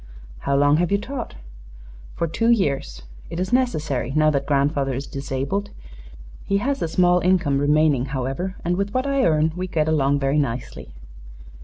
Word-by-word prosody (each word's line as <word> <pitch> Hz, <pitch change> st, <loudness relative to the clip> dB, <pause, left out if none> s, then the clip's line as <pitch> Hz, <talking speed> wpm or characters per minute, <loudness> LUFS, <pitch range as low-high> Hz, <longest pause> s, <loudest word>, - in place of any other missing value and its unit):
"How 140 Hz, -, -1 dB
long 145 Hz, +1 st, +4 dB
have 175 Hz, +2 st, 0 dB
you 200 Hz, -, +4 dB
taught?" 250 Hz, -, -6 dB, 0.8 s
"For 170 Hz, -, -1 dB
two 225 Hz, +8 st, 0 dB
years. 140 Hz, -, 0 dB, 0.3 s
It 165 Hz, -, -5 dB
is 185 Hz, +6 st, -2 dB
necessary, 155 Hz, -, 0 dB
now 155 Hz, 0 st, +4 dB
that 140 Hz, -2 st, -1 dB
grandfather 140 Hz, -1 st, +1 dB
is 135 Hz, +2 st, -4 dB
disabled. 140 Hz, +9 st, -3 dB, 0.7 s
He 200 Hz, -, 0 dB
has 275 Hz, +7 st, -1 dB
a -, -, 0 dB
small 180 Hz, +2 st, +3 dB
income 175 Hz, -7 st, +2 dB
remaining, 145 Hz, -2 st, +3 dB
however, 135 Hz, +8 st, -3 dB
and 175 Hz, +1 st, 0 dB
with 200 Hz, +3 st, -2 dB
what 255 Hz, +1 st, +1 dB
I 275 Hz, -1 st, +1 dB
earn 155 Hz, -1 st, +2 dB
we 185 Hz, +1 st, -3 dB
get 155 Hz, -3 st, 0 dB
along 145 Hz, -3 st, +2 dB
very 140 Hz, +1 st, +1 dB
nicely." 115 Hz, -, -4 dB
155 Hz, 170 wpm, -22 LUFS, 140-185 Hz, 0.8 s, long